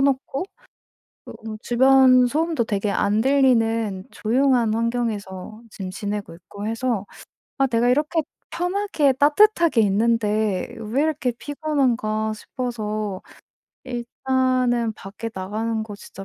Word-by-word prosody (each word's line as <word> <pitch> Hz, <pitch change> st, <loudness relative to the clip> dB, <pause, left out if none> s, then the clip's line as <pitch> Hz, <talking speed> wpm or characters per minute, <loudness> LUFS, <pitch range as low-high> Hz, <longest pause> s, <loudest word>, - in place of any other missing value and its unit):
놓고 275 Hz, +2 st, 0 dB, 0.8 s
쪼금 220 Hz, -1 st, -8 dB
주변 255 Hz, 0 st, +5 dB
소음도 310 Hz, 0 st, 0 dB
되게 205 Hz, -1 st, -1 dB
안 205 Hz, +2 st, +1 dB
들리는 230 Hz, -7 st, +2 dB
조용한 240 Hz, -1 st, +2 dB
환경에서 220 Hz, -3 st, -3 dB
지금 190 Hz, -3 st, -6 dB
지내고 205 Hz, -1 st, -5 dB
있고 200 Hz, +4 st, -9 dB
해서 230 Hz, -2 st, -1 dB, 0.5 s
'아 270 Hz, -, +4 dB
내가 240 Hz, -1 st, +1 dB
이렇게 300 Hz, +6 st, +2 dB, 0.3 s
편하게 360 Hz, -6 st, +1 dB
따뜻하게 310 Hz, -, +4 dB
있는데 215 Hz, -1 st, +1 dB
왜 230 Hz, +6 st, -1 dB
이렇게 305 Hz, -5 st, 0 dB
피곤한가.' 245 Hz, -6 st, -1 dB
싶어서 215 Hz, -5 st, -4 dB, 0.6 s
일단은 250 Hz, -1 st, 0 dB
밖에 210 Hz, +4 st, -7 dB
나가는 220 Hz, +4 st, -3 dB
거 210 Hz, -2 st, -8 dB
진짜 195 Hz, -1 st, -11 dB
230 Hz, 255 characters per minute, -22 LUFS, 215-265 Hz, 0.8 s, 주변